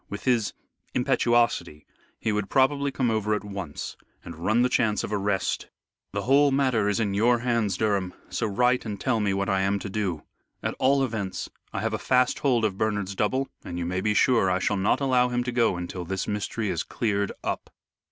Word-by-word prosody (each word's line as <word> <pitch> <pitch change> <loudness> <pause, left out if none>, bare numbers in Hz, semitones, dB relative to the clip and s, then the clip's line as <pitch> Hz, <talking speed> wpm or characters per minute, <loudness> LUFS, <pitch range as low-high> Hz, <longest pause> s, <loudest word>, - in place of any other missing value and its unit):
With 100 - -6
his 120 -5 +1 0.4
impetuosity, 120 - +1 0.3
he 110 - 0
would 105 -1 -1
probably 140 +1 +2
come 130 -3 0
over 110 -1 +1
at 105 - -4
once, 95 -7 -6 0.3
and 85 - -7
run 110 +9 +2
the - - +4
chance 110 -4 +1
of 105 - -4
arrest. 100 -1 -1 0.4
The 100 0 -3
whole 140 +4 +5
matter 130 -6 +2
is 105 - 0
in 105 -3 0
your 120 +4 +3
hands, 115 -5 0
Durham, 100 -4 0
so 115 - -2
write 125 +5 +2
and 105 -3 -5
tell 125 -4 +1
me 105 -2 +1
what 100 0 -1
I 95 -1 +1
am 100 +1 +1
to 100 0 -6
do. 95 -7 -2 0.4
At - - -1
all 135 +1 +3
events 110 -7 -3 0.2
I 100 - -3
have 110 0 -1
a 110 - -1
fast 125 +1 +2
hold 120 -5 +2
of 100 -3 -2
Bernard's 105 -3 -1
double, 130 +7 0 0.2
and 85 - -6
you 85 - -2
may 90 +2 -1
be 105 +1 +1
sure 115 -6 +4
I 90 - +2
shall 100 +2 0
not 100 +7 +1
allow 125 -2 +3
him 125 0 0
to 125 - -3
go 115 -6 +2
until 90 +1 -5
this 95 +1 -3
mystery 105 +1 -2
is 85 - -1
cleared 100 -3 -1
up." - - -3
105 Hz, 210 wpm, -26 LUFS, 100-125 Hz, 0.4 s, whole